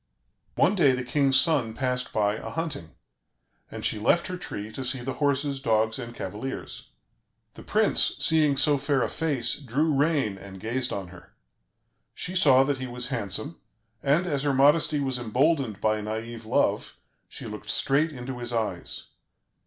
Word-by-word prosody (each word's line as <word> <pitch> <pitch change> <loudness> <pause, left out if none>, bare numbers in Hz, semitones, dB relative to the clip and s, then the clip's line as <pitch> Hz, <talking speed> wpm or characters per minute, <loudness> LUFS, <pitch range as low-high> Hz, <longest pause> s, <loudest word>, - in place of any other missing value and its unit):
One 190 - +3
day 155 -10 +4
the 125 0 -2
king's 135 +1 +3
son 125 -7 +2
passed 125 0 -1
by 105 -1 +1
a - - -7
hunting, 160 - -5 0.7
and - - -6
she 105 - 0
left 170 +10 +2
her 185 - -4
tree 135 - -7
to 135 - -6
see 130 0 -2
the 130 +2 -4
horses, 140 -1 0
dogs, 110 -1 +1
and 120 -1 -7
cavaliers. 105 +8 -6 0.6
The - - -12
prince, - - +2
seeing 155 -3 +3
so 145 0 +4
fair 140 -1 +1
a - - 0
face, 140 -7 +1
drew 150 +4 0
rein 140 -9 +1
and 95 -1 -11
gazed 120 +5 -1
on 95 -3 -5
her. 90 -1 -15 0.8
She 180 - -4
saw 135 -7 +6
that 135 -1 -1
he 130 - -4
was 125 +1 -2
handsome; 120 - -3 0.4
and, 150 +6 +2
as 145 -6 -1
her 140 -1 0
modesty 150 +2 +4
was 135 -3 -1
emboldened 125 -1 0
by 110 0 0
naïve 110 +2 -6
love, - - 0 0.3
she - - -7
looked - - -8
straight 150 +4 +2
into 125 -2 -7
his 120 0 -2
eyes. 115 -2 -3
130 Hz, 170 wpm, -26 LUFS, 115-145 Hz, 0.8 s, saw